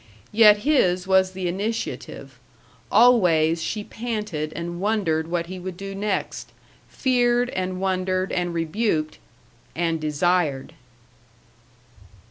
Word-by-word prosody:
Yet 210 -1 +6
his 185 -12 +2
was 190 0 +3
the 185 -1 -3
initiative; 175 - -5 0.5
always 175 -9 +4
she 210 +5 -3
panted 210 -10 -4
and 175 +1 -5
wondered 190 -7 0
what 170 0 -2
he 185 +2 -8
would 180 0 -7
do 195 +1 -6
next, 200 0 -3 0.4
feared 245 -1 +1
and 185 0 -3
wondered 185 0 -1
and 175 -1 -1
rebuked 165 -1 -1 0.6
and 165 -1 -1
desired. 155 -2 0
185 Hz, 105 wpm, -23 LUFS, 165-210 Hz, 0.6 s, Yet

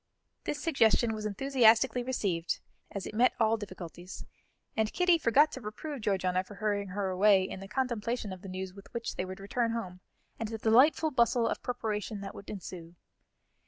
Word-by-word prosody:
This 290 - -2
suggestion 235 -7 +3
was 215 -1 -3
enthusiastically 245 +1 +4
received, 200 -9 -1 0.3
as 200 -2 -5
it - - -6
met 240 +4 +4
all 225 -1 +4
difficulties, 185 -4 -8 0.5
and 220 -1 +1
Kitty 360 -2 +3
forgot 295 +4 +4
to 265 - -7
reprove 255 +6 -6
Georgiana 185 -3 +1
for 205 +2 -12
hurrying 205 -1 -1
her 195 +1 -2
away, 190 +1 +5
in 190 - -5
the 195 - -8
contemplation 235 -3 -2
of 185 - -10
the 195 - -8
news 185 0 -5
with 200 0 -14
which 235 0 -3
they 185 - -2
would 185 +1 -7
return 230 +3 -1
home, 185 -6 -5 0.4
and 225 -2 -3
the 225 - -4
delightful 260 +8 +4
bustle 235 -2 +3
of - - -2
preparation 215 -4 -3
that 195 -1 -6
would 200 - -11
ensue. 175 -4 -8
215 Hz, 180 wpm, -30 LUFS, 190-240 Hz, 0.5 s, away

